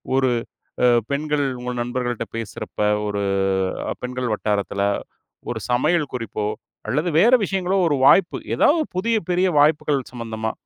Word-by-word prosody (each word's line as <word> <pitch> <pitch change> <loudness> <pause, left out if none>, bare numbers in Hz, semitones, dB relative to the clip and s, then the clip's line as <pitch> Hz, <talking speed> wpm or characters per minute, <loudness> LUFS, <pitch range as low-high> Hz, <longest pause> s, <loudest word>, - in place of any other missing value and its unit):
ஒரு 130 -2 +3 0.5
அ, - - +6 0.2
பெண்கள் 145 0 0 0.2
உங்க 125 0 -3
நண்பர்கள்ட 120 -1 -3
பேசுறப்ப, 110 -3 -7 0.3
ஒரு 100 0 -2 0.8
பெண்கள் 125 -2 -3
வட்டாரத்தில, 100 -1 -1 0.7
ஒரு 110 - -4
சமையல் 150 +4 +1
குறிப்போ 110 -3 -3 0.4
அல்லது 150 +6 0
வேறு 240 +7 +6
விஷயங்களோ 190 0 0
ஒரு 145 - +2
வாய்ப்பு. 180 +5 +5 0.2
ஏதா - - +4 0.3
புதிய 230 +5 +1 0.2
பெரிய 180 +2 +2
வாய்ப்புகள் 150 -3 +2
சம்பந்தமா. 110 -2 -4
130 Hz, 125 wpm, -22 LUFS, 115-155 Hz, 0.8 s, அ